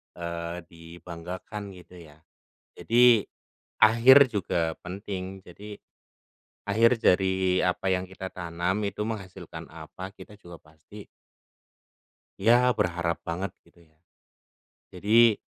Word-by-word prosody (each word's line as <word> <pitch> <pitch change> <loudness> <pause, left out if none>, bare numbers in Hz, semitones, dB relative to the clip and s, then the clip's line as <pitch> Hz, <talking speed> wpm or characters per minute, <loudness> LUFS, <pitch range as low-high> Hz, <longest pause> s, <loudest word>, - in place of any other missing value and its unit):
eee, 85 0 -5
dibanggakan 85 +4 -9
gitu 90 0 -15
ya. 80 -2 -16 0.5
Jadi 120 -2 +4 0.6
akhir 125 +4 +7
juga 85 -5 -1
penting. 95 0 -7
Jadi 105 +4 -11 0.9
akhir 115 +3 +3
dari 95 0 +2
apa 90 +1 -1
yang 95 0 0
kita 95 0 -8
tanam 90 +4 -3
itu 100 - -4
menghasilkan 95 -6 -7
apa 80 +4 -9
kita 105 - -14
juga 85 -4 -13
pasti 80 +7 -15 1.4
ya 120 +4 +4
berharap 85 -4 -1
banget 90 +4 -4
gitu 85 0 -24
ya. 80 - -37 0.9
Jadi 110 +4 +4
95 Hz, 105 wpm, -26 LUFS, 85-105 Hz, 1.4 s, akhir